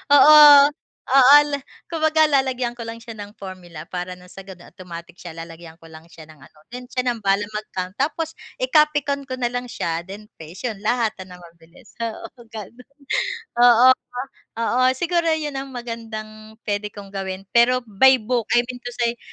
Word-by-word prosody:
Oo, 300 +2 +8 0.8
oo, 275 +1 +8 0.2
la 285 - -2 0.3
kumbaga 315 -1 +2
lalagyan 260 -4 0
ko 230 -1 -8
lang 230 0 -8
siya 230 - -9
ng 205 +2 -9
formula 180 -5 -10
para 180 +1 -6 0.2
sa 195 - -10
ganon 180 -2 -13
automatic 175 -2 -11
siya 170 -2 -10
lalagyan 165 0 -11
ko 165 -1 -17
lang 160 +1 -14
siya 165 -2 -14
ng 155 -1 -18
ano, 145 +2 -19
then 250 0 -9
siya 255 0 -3
na 230 - -6
bahalang 205 +1 0
mag-count, 190 -3 -5
tapos 315 +3 -1 0.3
i-copy 300 +2 +3
ko 280 -2 -4
na 245 -1 -2
lang 245 0 -4
siya 170 -5 -4
then 205 +2 -10
paste, 165 +7 -10
yun 205 - -11
lahat 220 +1 0 0.2
na 180 - -12
mabilis, 170 +2 -18
oo 230 +2 -6
ganun. 225 +3 -11 0.7
Oo, 245 +1 +7 0.7
oo 245 +2 0
siguro 340 +2 0
'yon 300 -3 -5
ang 270 0 -7
magandang 220 -2 -8
puwede 205 0 -2
kong 200 -1 -11
gawin, 190 -1 -5
pero 245 +1 +3
by 240 +5 +4
book 240 0 -1
I 240 - +4
mean 250 -1 -7
to 245 - -6
say 235 -1 -1
225 Hz, 175 wpm, -21 LUFS, 185-255 Hz, 0.8 s, Oo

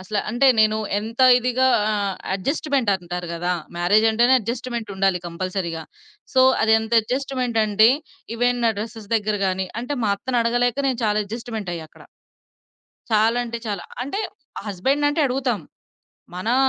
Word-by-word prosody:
అసల 205 +3 -3
అంటే 240 +4 +2
నేను 215 0 +4 0.2
ఎంత 225 +4 -2 0.2
ఇదిగా 250 +1 +1 0.2
ఆహ్, 200 -2 -1 0.2
అడ్జస్ట్‌మెంటంటారు 195 - -1
గదా! 175 +2 -1 0.2
మ్యారేజంటేనే 220 +7 +4
అడ్జస్ట్‌మెంటుండాలి 220 -5 -2
కంపల్సరీగా. 170 -1 -4 0.5
సో, 260 - +5 0.2
అదెంత 220 +1 +2
ఎడ్జస్ట్‌మెంటంటే, 230 -4 +2 0.5
ఈవెన్ 245 0 +1
నా 230 - +4
డ్రస్సెస్ 220 0 -7
దగ్గర 210 -1 -1
గానీ 190 0 -1
అంటే, 250 +5 -3
మా 205 - +2
అత్తనడగలేక 245 +2 0
నేను 255 -2 -2
చాలా 210 0 +2
ఎడ్జస్ట్‌మెంటయ్యాక్కడ. 205 -7 -6 1.1
చాలా 220 +2 +3
అంటే 235 0 -5
చాలా. 200 -4 -3 0.2
అంటే, 280 +10 -4 0.5
హస్బెండ్‌నంటే 280 - 0
అడుగుతాం. 255 -5 -1 0.7
మనా 215 +7 -1
220 Hz, 115 wpm, -22 LUFS, 200-245 Hz, 1.1 s, సో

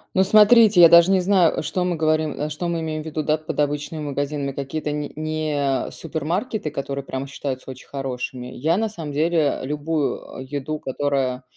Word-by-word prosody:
Ну, 190 - +5
смотрите, 215 -1 +6
я 170 - +10
даже 170 +2 +7
не 190 -1 +4
знаю, 180 -3 +3
э, - - -1
что 170 +4 -2
мы 180 -1 0
говорим 155 -1 +1
э, 150 +1 -2
что 155 +4 -4
мы 170 -1 -1
имеем 155 -1 -3
ввиду, 155 0 -4
да, 155 +1 +1
под 155 0 -7
обычными 150 +2 -2
магазинами, 145 -1 -3
какие-то 140 +3 -4
не 150 -1 -4
не 150 -3 -1
супермаркеты, 165 - -3
которые 140 -1 -5
прямо 135 +1 -4
считаются 135 -1 -5
очень 130 - -13
хорошими? 130 -2 -5
Я 155 +7 0
на 220 +2 0
самом 165 -8 -7
деле 155 0 +1
любую, 150 +2 -2
а, - - -7
еду, 145 +3 -4
которая, 130 -2 -1
150 Hz, 185 wpm, -22 LUFS, 140-165 Hz, -, я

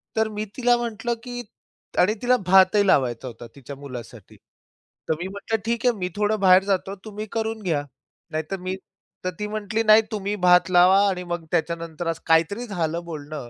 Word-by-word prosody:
तर 220 0 +2
मी 215 - -2
तिला 245 -1 +4
म्हंटलं, 235 0 -3
की 245 -1 -6 0.6
आणि 190 +4 +4
तिला 250 +1 +4
भातही 190 +2 +5
लावायचा 130 -7 +2
होता 120 -1 -9
तिच्या 140 0 -9
मुलासाठी. 125 -6 -10 0.7
तर - - +4
मी 175 - -4
म्हंटलं, 200 +3 -3
ठीक 235 +1 -1
आहे. 245 - +4
मी 180 -1 -3
थोडं 210 +1 0
बाहेर 185 -1 +6
जातो 195 0 -1
तुम्ही 215 0 -6
करून 225 -1 -2
घ्या 160 -6 0 0.5
नाहीतर 155 +5 -3
मी, 185 +1 -3 0.5
तर - - +1
ती 210 - -2
म्हटली 215 +1 -2
नाही, 215 0 +7
तुम्ही 205 -1 -2
भात 180 +1 +5
लावा 180 +2 +6
आणि 180 -1 -3
मग 175 -2 -5
त्याच्यानंतर 165 +1 -2
असं 165 -1 -2
काहीतरी 165 +8 +2
झालं 170 -4 -2
बोलणं. 150 -5 -7
185 Hz, 180 wpm, -23 LUFS, 160-215 Hz, 0.7 s, नाही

